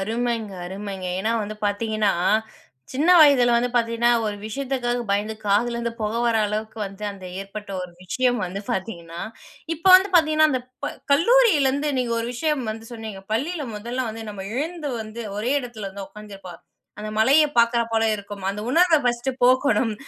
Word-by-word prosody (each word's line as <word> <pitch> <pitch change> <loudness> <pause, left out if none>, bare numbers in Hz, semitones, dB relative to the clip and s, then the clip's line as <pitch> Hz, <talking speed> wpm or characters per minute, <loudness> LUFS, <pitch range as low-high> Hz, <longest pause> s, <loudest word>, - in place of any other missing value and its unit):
அருமைங்க, 225 0 -2
அருமைங்க. 195 0 -6
ஏன்னா 220 +3 0
வந்து 210 +1 -6
பார்த்தீங்கன்னா, 215 0 0 0.8
சின்ன 300 +7 +2
வயதில 255 -5 +6
வந்து 240 +1 +1
பார்த்தீங்கன்னா, 230 0 +2 0.2
ஒரு 210 -1 -3
விஷயத்துக்காக 245 0 -2
பயந்து 210 +2 0
காதுல 235 +4 +2
இருந்து 235 0 -3
புக 215 0 -1
வர 230 -1 +2
அளவுக்கு 215 +2 -4
வந்து 195 +2 -9
அந்த 190 -2 -12 0.2
ஏற்பட்ட 200 +1 -8
ஒரு 180 - -8
விஷயம் 245 +6 0
வந்து 185 +2 -5
பார்த்தீங்கன்னா 170 -4 -4 0.5
இப்போ 335 +5 0
வந்து 380 +2 +1
பார்த்தீங்கன்னா, 310 -2 +5
அந்த 255 -3 0 0.2
ப - - -2 0.2
கல்லூரியில 355 - +5
இருந்து 285 +2 -1
நீங்க 240 -2 -1
ஒரு 230 - -3
விஷயம் 295 0 -1
வந்து 225 +1 -7
சொன்னீங்க, 220 -4 -7
பள்ளியில 295 +7 -1
முதல 240 +5 -3
வந்து 225 +1 -6
நம்ம 195 -2 -7
எழுந்து 320 -1 -3
வந்து 220 +2 -7
ஒரே 230 +5 0
இடத்துல 230 -5 -7
வந்து 195 0 -7
உக்காந்துருப்போம். 195 -5 -11 0.4
அந்த 215 - -5
மலைய 275 +8 +5
பார்க்கிறாப் 235 -1 +3
போல 225 0 +2
இருக்கும். 200 -1 -9
அந்த 205 +1 -5
உணர்வ 335 +1 +5
ஃபர்ஸ்ட்டு 240 +1 0
போக்கணும் 255 -2 +3
230 Hz, 165 wpm, -23 LUFS, 210-260 Hz, 0.8 s, வயதில